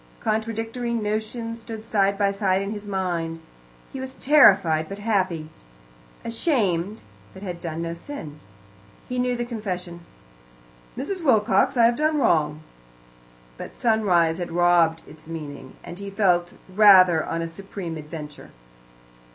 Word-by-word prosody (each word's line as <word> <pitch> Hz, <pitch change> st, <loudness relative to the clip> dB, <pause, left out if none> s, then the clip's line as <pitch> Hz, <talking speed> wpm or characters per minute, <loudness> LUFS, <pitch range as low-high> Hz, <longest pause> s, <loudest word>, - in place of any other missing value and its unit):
Contradictory 225 Hz, +2 st, -2 dB
notions 230 Hz, +2 st, -3 dB
stood 225 Hz, -1 st, -8 dB
side 200 Hz, -3 st, +1 dB
by 200 Hz, -1 st, +2 dB
side 195 Hz, -1 st, +1 dB
in 200 Hz, +1 st, -3 dB
his 210 Hz, -1 st, -6 dB
mind. 175 Hz, -4 st, -2 dB, 0.5 s
He 265 Hz, -, -5 dB
was 260 Hz, 0 st, -6 dB
terrified 195 Hz, -, +5 dB
but 195 Hz, -, -6 dB
happy, 185 Hz, -7 st, -1 dB, 0.7 s
ashamed, 215 Hz, -, 0 dB, 0.3 s
but 190 Hz, -, -10 dB
had 180 Hz, -3 st, -6 dB
done 165 Hz, -1 st, -4 dB
no 165 Hz, 0 st, -3 dB
sin. 170 Hz, -, -9 dB, 0.7 s
He 250 Hz, 0 st, -3 dB
knew 250 Hz, 0 st, +1 dB
the 240 Hz, 0 st, -3 dB
confession: 185 Hz, -7 st, -5 dB, 1.0 s
"Mrs. 345 Hz, +8 st, -4 dB
Wilcox, 245 Hz, 0 st, +3 dB
I 235 Hz, -, +6 dB
have 235 Hz, +1 st, +3 dB
done 310 Hz, 0 st, +1 dB
wrong," 155 Hz, -, +1 dB, 0.9 s
but -, -, -9 dB
sunrise 185 Hz, -8 st, +2 dB
had 175 Hz, -1 st, -4 dB
robbed 170 Hz, -1 st, +3 dB
its 155 Hz, +1 st, -14 dB
meaning, 145 Hz, -5 st, -8 dB
and 175 Hz, -, -9 dB
he 200 Hz, 0 st, -6 dB
felt 180 Hz, -4 st, +1 dB
rather 185 Hz, -4 st, +6 dB
on 165 Hz, 0 st, -3 dB
a -, -, -3 dB
supreme 175 Hz, 0 st, -7 dB
adventure. 150 Hz, -1 st, -9 dB
195 Hz, 135 wpm, -24 LUFS, 170-225 Hz, 1.0 s, I